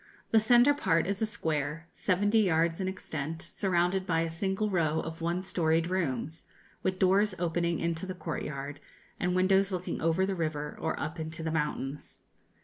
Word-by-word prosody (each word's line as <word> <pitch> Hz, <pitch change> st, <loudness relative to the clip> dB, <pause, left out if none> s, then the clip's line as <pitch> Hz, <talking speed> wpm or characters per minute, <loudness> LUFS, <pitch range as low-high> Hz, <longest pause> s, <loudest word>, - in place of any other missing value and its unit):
The 225 Hz, -, +6 dB
centre 240 Hz, +5 st, +6 dB
part 165 Hz, -, +2 dB
is 200 Hz, +2 st, -2 dB
a 220 Hz, -, +2 dB
square, 155 Hz, -4 st, -2 dB
seventy 205 Hz, +4 st, +2 dB
yards 165 Hz, -3 st, +2 dB
in 185 Hz, -, -1 dB
extent, 160 Hz, -4 st, -4 dB
surrounded 185 Hz, +1 st, 0 dB
by 165 Hz, -1 st, +2 dB
a 165 Hz, 0 st, -1 dB
single 190 Hz, +5 st, -1 dB
row 160 Hz, -4 st, +2 dB
of 165 Hz, +1 st, -6 dB
one 170 Hz, +2 st, -1 dB
storied 165 Hz, -2 st, +1 dB
rooms, 160 Hz, -3 st, -2 dB, 0.4 s
with 185 Hz, 0 st, 0 dB
doors 195 Hz, +2 st, +3 dB
opening 170 Hz, 0 st, 0 dB
into 170 Hz, +2 st, -2 dB
the 185 Hz, -, -4 dB
courtyard, 145 Hz, -4 st, -5 dB, 0.4 s
and 180 Hz, 0 st, 0 dB
windows 190 Hz, +2 st, +3 dB
looking 180 Hz, -1 st, -3 dB
over 165 Hz, +3 st, +2 dB
the 195 Hz, -, -1 dB
river 155 Hz, -4 st, -2 dB
or -, -, -1 dB
up 155 Hz, +2 st, -4 dB
into 160 Hz, +1 st, -5 dB
the 160 Hz, -, -1 dB
mountains. 150 Hz, -2 st, -3 dB
170 Hz, 170 wpm, -30 LUFS, 160-190 Hz, 0.4 s, The